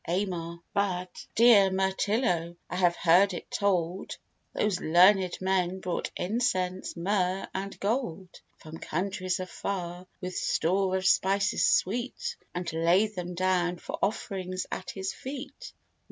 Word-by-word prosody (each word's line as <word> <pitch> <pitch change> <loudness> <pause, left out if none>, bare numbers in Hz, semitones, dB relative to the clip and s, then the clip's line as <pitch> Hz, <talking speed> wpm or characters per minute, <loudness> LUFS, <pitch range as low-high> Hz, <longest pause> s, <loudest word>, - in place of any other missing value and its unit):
AMAR. 170 -2 -2
But, 185 -3 -2
dear 220 -4 +7
Mirtillo, 190 -2 0 0.2
I - - -2
have 175 -2 +3
heard 180 +3 +4
it - - -8
told, 185 -2 -1 0.3
Those 205 -4 0
learned 180 +3 +5
men 190 -1 0
brought 180 -2 -3
incense, 185 -4 -1
myrrh, 185 +1 0
and 195 +1 -5
gold, 195 -5 -3 0.2
From 160 +1 -10
countries 185 +1 -2
far, 180 -2 -5
with 180 -1 -5
store 190 +3 +1
of 190 - -4
spices 195 +1 +3
sweet, 240 +7 0 0.2
And 175 -2 -3
laid 175 +6 +3
them 180 -2 -5
down 180 -1 +1
for - - -7
offerings 185 -2 -2
at 185 - -5
his 190 0 -4
feet. 280 - -8
185 Hz, 125 wpm, -28 LUFS, 175-200 Hz, 0.3 s, dear